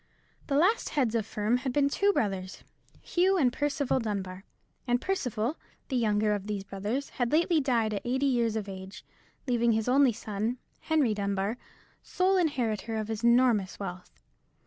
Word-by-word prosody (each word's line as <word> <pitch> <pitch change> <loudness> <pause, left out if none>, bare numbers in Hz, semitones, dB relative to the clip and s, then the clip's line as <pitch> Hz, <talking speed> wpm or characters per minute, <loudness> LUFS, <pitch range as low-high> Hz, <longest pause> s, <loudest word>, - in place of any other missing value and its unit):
The 275 - 0
last 370 +10 +3
heads 255 -7 0
of 225 -3 0
the - - -18
firm 215 +3 +1
had 260 +1 -3
been 280 +2 +2
two 400 +8 +2
brothers, 195 - -2 0.4
Hugh 375 +2 +2
and 255 -7 +3
Percival 285 -2 0
Dunbar; 195 -4 -4 0.4
and 245 0 +2
Percival, 255 - -2 0.3
the 265 - -2
younger 210 -3 +2
of 205 -1 -4
these 205 -2 -3
brothers, 205 +8 -3
had 245 -2 -2
lately 330 +1 +3
died 235 -5 +1
at 200 - -2
eighty 260 +3 0
years 235 -4 +1
of 215 -2 -3
age, 190 0 -9 0.4
leaving 235 -3 +2
his 220 +1 -1
only 265 0 +5
son, 220 +2 -3 0.2
Henry 300 -8 +1
Dunbar, 200 +1 -1 0.5
sole 375 +1 +1
inheritor 235 - -1
of 215 0 -3
his 220 0 -4
enormous 235 -5 +3
wealth. 180 -2 -6
235 Hz, 170 wpm, -29 LUFS, 210-275 Hz, 0.5 s, only